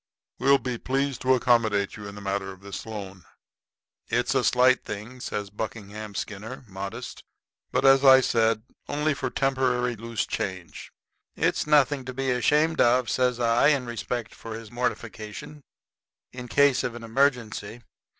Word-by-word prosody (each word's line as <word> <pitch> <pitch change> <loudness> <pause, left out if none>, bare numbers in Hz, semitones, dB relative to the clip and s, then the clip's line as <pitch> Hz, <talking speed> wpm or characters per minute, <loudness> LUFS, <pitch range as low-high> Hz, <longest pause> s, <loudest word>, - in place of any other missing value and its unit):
We'll 140 +2 +5
be 125 -3 -4
pleased 135 0 -1
to 130 0 +4
accommodate 110 -5 +2
you 105 -1 -8
in 100 - -9
the 105 - -9
matter 95 0 -2
of 95 0 -13
this 100 +2 -7
loan.' 100 -4 -7 0.8
"It's 120 +3 0
a 135 -2 +2
slight 125 +1 +4
thing," 110 +5 -7
says 105 -4 -4
Buckingham 105 -1 -6
Skinner, 110 +7 -6
modest, 100 0 -7 0.5
"but, - - +1
as 135 0 +6
I 130 -1 +9
said, 115 -3 +1 0.3
only 150 +1 +1
for 130 -1 -3
temporary 125 -2 0
loose 115 0 -3
change." 90 -3 -5 0.4
"It's - - 0
nothing 145 -2 +3
to 130 0 -6
be 135 0 0
ashamed 150 +6 +2
of," 120 0 +3
says 125 -1 +1
I, 115 +2 +3
in 140 -4 +2
respect 120 0 -4
for 115 -1 -8
his 115 -2 -9
mortification; 120 +2 -5 0.7
"in 125 -1 -8
case 140 +1 +3
of 125 -2 -3
an 120 - -8
emergency. 115 -2 0
120 Hz, 155 wpm, -26 LUFS, 105-130 Hz, 0.8 s, I